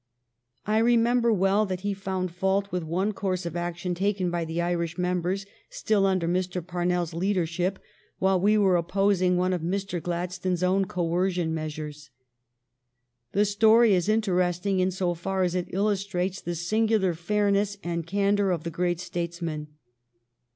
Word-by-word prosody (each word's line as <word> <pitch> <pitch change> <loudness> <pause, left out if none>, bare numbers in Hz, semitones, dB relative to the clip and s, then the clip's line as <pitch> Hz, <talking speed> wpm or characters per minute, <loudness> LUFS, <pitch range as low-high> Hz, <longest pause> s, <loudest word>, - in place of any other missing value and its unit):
I 215 +1 +2
remember 235 +1 +3
well 200 +1 +2
that 185 -1 -3
he 200 +1 -1
found 190 -2 -3
fault 190 +3 0
with 180 - -1
one 180 +6 -1
course 185 -2 -2
of 170 - -4
action 175 +1 -3
taken 190 0 0
by 170 -1 -1
the 160 +1 -4
Irish 170 -1 -1
members, 180 +2 -1 0.2
still 205 -3 +1
under 185 -3 +1
Mr. 180 +1 -1
Parnells 175 -1 -1
leadership, 180 0 0 0.4
while 190 -1 +2
we 210 +2 +4
were 190 -4 +4
opposing 185 +1 +2
one 185 +1 +1
of 180 - -2
Mr. 185 +1 -2
Gladstone 180 +2 -2
s 180 0 -2
own 190 +2 +2
coercion 175 -1 -1
measures. 150 -1 -6 1.2
The 205 +1 +3
story 220 +2 +5
is 185 +2 +1
interesting 185 -3 +1
in 185 0 +2
so 180 -1 -1
far 190 +3 -2
as 175 -1 0
it 180 -1 -2
illus 200 0 0
trates 185 0 -2
the 175 - -3
singular 210 +2 +1
fairness 200 +3 0
and 170 -1 -3
candor 200 +1 +1
of 170 -4 -1
the 170 - -4
great 175 +1 -1
statesman. 170 -3 -4
185 Hz, 160 wpm, -26 LUFS, 175-200 Hz, 1.2 s, story